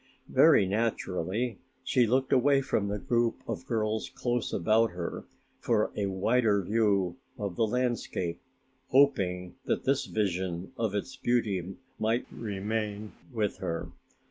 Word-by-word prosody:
Very 135 -6 +6
naturally 105 +1 -1 0.2
she 125 -2 +3
looked 130 +3 +2
away 135 +2 +4
from 105 -5 0
the 100 +1 -2
group 115 +4 +1
of 130 - -4
girls 110 -2 -1
close 120 -2 -2
about 110 +5 +3
her 90 -1 -5 0.3
for 110 -3 +1
a 100 -1 0
wider 100 +2 +2
view 100 -4 +1 0.2
of 100 -4 -3
the 115 - +2
landscape, 120 -8 -1 0.5
hoping 90 -10 +2
that - - 0
this 135 0 +1
vision 95 -3 -2
of 110 -3 -1
its 130 +6 -3
beauty 100 -8 0 0.2
might 115 +3 +1
remain 105 0 -3 0.2
with 110 -4 -1
her. 85 0 -4
110 Hz, 130 wpm, -29 LUFS, 95-120 Hz, 0.5 s, Very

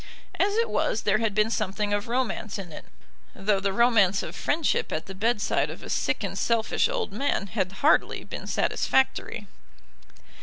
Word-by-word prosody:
As 405 +1 +2
it 460 +1 +2
was 215 - 0
there 210 +1 +2
had 220 -3 -1
been 215 +1 +2
something 205 0 -1
of 205 +1 -1
romance 235 -3 -2
in 185 -4 -7
it, - - -10 0.5
though 195 0 +1
the 195 0 0
romance 205 -3 +3
of - - -7
friendship 310 0 0
at 155 - -3
the 195 - -8
bedside 215 +2 0
of - - -9
a - - -6
sick - - 0
and - - -3
selfish 230 -2 +1
old 195 - -3
man 245 -3 0
had 190 -2 -2
hardly 310 - +3
been - - -7
satisfactory. 265 -5 0
215 Hz, 175 wpm, -26 LUFS, 195-240 Hz, 0.5 s, romance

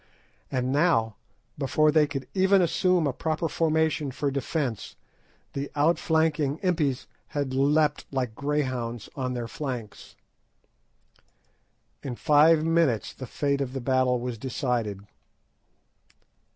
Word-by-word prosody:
And 130 0 -1
now, 135 - +2 0.4
before 150 +2 +3
they 150 -1 +4
could 135 -2 -5
even 190 +1 +4
assume 180 -1 +2
a 140 - 0
proper 160 +4 -1
formation 160 -2 +1
for 140 +2 -2
defence, 135 - -3 0.6
the 140 +1 -4
outflanking 160 -1 +1
Impis 155 -8 0 0.2
had 140 -3 -3
leapt, 145 +2 +2
like 130 -4 -2
greyhounds, 130 -5 -2
on 125 -2 -2
their 120 -1 -3
flanks. 125 -6 -6 1.9
In 125 -3 -5
five 155 +4 +4
minutes 165 - +1
the 130 - -8
fate 140 +1 -1
of 130 -2 -3
the 135 - -3
battle 130 -1 +2
was 120 -2 -5
decided. 115 -5 -2
140 Hz, 115 wpm, -26 LUFS, 125-155 Hz, 1.9 s, they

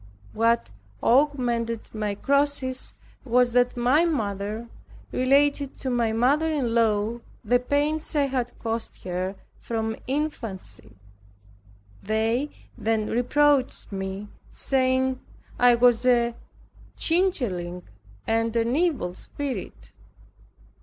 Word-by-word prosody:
What 230 - +2 0.3
augmented 240 -4 +1
my 210 -2 -2
crosses 280 0 0 0.3
was 245 -1 +3
that 245 0 +2
my 255 +7 +4
mother 215 - -2 0.4
related 280 +2 +2
to 260 - -3
my 235 -2 +1
mother 280 +8 +2
in 260 -7 0
law 225 0 +1 0.3
the 245 +3 +4
pains 295 +5 0
I 290 -1 +3
had 255 -3 -3
cost 225 0 -4
her 185 +1 -3 0.2
from 225 -1 -2
infancy. 235 - -4 1.1
They 225 +6 0 0.3
then 220 -1 -1
reproached 275 +2 +2
me, 195 +1 -5 0.2
saying, 260 -1 +1 0.4
I 245 -1 +6
was 240 0 +4
a 235 -1 +3 0.6
changeling, 235 - 0 0.4
and 225 0 0
an 230 +2 +1
evil 300 - 0
spirit. 275 +8 -6
240 Hz, 100 wpm, -25 LUFS, 220-275 Hz, 1.1 s, I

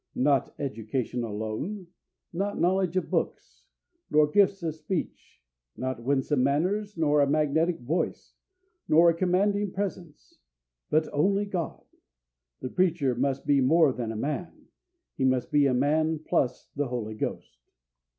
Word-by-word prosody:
Not 135 +1 +1
education 120 -1 -3
alone, 110 - -4 0.5
not 200 +4 -2
knowledge 185 0 +1
of 185 - -2
books, - - -3 0.4
not 150 0 +3
gifts 200 -2 +3
of 160 -2 -1
speech, 155 - -5 0.3
not 130 -2 -3
winsome 135 +2 +1
manners, 185 +10 0
nor 150 -2 +3
a 140 - +3
magnetic 155 +3 +1
voice, 150 +9 -2 0.5
nor 170 +2 +6
a - - -1
commanding 195 +4 +1
presence, 185 -5 -6 0.5
but 155 +1 +2
only 195 +7 +2
God. 180 -5 -4 0.8
The 130 - -4
preacher 165 -6 +1
must 135 +2 -1
be 140 -1 +3
more 155 +1 +4
than 115 -3 -4
a - - -6
man 150 +9 -4 0.5
he 135 - -1
must 130 -1 +1
be 145 -1 +4
a 130 - +1
man 155 +4 +2
plus 130 -4 -1
the 145 -1 -1
Holy 120 -3 -4
Ghost. 110 - -5
150 Hz, 140 wpm, -27 LUFS, 130-180 Hz, 0.8 s, nor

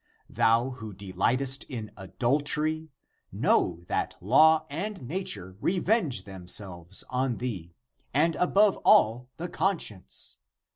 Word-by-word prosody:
Thou 115 +3 +3
who 110 -4 -8
delight 100 +6 0
est 135 0 +1
in 110 -6 -6
adultery, 150 - -1 0.4
know 85 -1 +1
that - - -1
law 155 - +5
and 190 +8 -4
nature 135 - -5
revenge 180 - +1
themselves 95 -1 -3
on 125 -1 0
thee, 90 -9 -5 0.4
and 160 +5 +2
above 195 +3 +3
all 120 +4 +4
the 175 - -4
conscience! 170 - -2
125 Hz, 110 wpm, -28 LUFS, 100-160 Hz, 0.4 s, law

